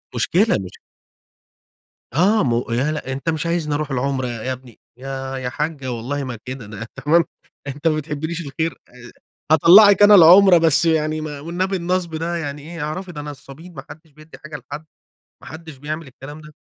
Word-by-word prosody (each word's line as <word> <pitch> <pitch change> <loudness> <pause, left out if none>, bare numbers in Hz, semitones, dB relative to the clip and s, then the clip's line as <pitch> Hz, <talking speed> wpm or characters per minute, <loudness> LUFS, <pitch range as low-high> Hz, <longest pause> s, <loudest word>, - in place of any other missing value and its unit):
مشكلة 185 - +2
مش 90 - -12 1.4
آه، 195 +8 +3
مو 120 -2 +1
لأ، 130 +6 0
لأ 135 -3 -5
"أنت 135 +4 -5
مش 160 0 -3
عايزني 170 -3 -1
أروح 150 0 -3
العمرة 135 0 -1
ي - - -4 0.2
يا 130 - -1
ابني." 125 -3 -12 0.2
"يا 135 +1 -6
يا 130 -1 -4
حاجة 145 -2 -4
والله 130 +5 -4
ما 125 -3 -6
كده، 130 -3 -7
ده" 105 +2 -8 0.2
تمام، 165 +3 +4 0.4
"أنت 145 +4 -2
ما 155 - 0
بتحبليش 155 +2 -4
الخير؟!" 160 +4 -3
آآ، 125 0 -15 0.4
"هاطلّعك 195 +6 +7
أنا 205 0 +8
العمرة 185 +1 +8
بس 160 -1 +3
يعني 155 -1 0
ما 150 -2 -6
والنبي 180 +5 -2
النصب 175 -1 -2
ده 165 +2 -3
يعني 145 -3 -5
إيه؟ 165 +1 -8
اعرفي 180 +5 -5
ده 150 -3 -7
نصابين، 145 +4 -11
ما 135 -2 -9
حدش 160 +1 -13
بيدّي 155 +2 -16
حاجة 155 -1 -9
لحد، 145 +3 -9 0.6
ما - - -14
حدش 160 -2 -10
بيعمل 155 +3 -6
الكلام 135 +3 -11
ده." 155 0 -14
150 Hz, 185 wpm, -20 LUFS, 135-165 Hz, 1.4 s, أنا